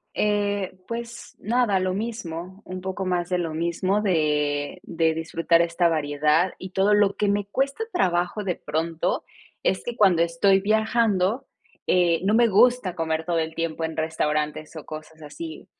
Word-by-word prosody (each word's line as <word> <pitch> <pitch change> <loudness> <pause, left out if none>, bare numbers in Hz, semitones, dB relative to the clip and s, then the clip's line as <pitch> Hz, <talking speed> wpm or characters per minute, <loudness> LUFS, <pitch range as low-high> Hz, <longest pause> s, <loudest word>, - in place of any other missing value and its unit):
Eh, 205 -2 0
pues, 235 0 -7
nada, 220 -3 +1
lo 185 0 0
mismo, 190 -4 -5
un 185 0 -6
poco 190 0 -4
más 180 -1 -1
de 180 - +1
lo 165 -3 -3
mismo 175 +5 0
de 150 -6 0
de 165 -1 0
disfrutar 165 +1 +2
esta 170 +1 +2
variedad 155 +2 +1
y 185 - -8
todo 195 +2 +2
lo 205 -1 +3
que 210 - +1
me 205 0 0
cuesta 275 - -1
trabajo, 180 - 0
de 180 -3 -1
pronto, 160 +2 -2 0.4
es 190 - +1
que 240 -1 -4
cuando 190 -6 +4
estoy 190 +4 +3
viajando, 220 +2 +1 0.4
eh, 175 -2 +3
no 210 - +2
me 235 +1 +5
gusta 225 -2 +3
comer 160 0 -2
todo 170 -1 0
el 160 0 -2
tiempo 165 -1 -2
en 160 0 -4
restaurantes 155 -1 -2
o 155 - -7
cosas 155 0 -10
así. 155 +2 -8
180 Hz, 165 wpm, -24 LUFS, 160-205 Hz, 0.4 s, me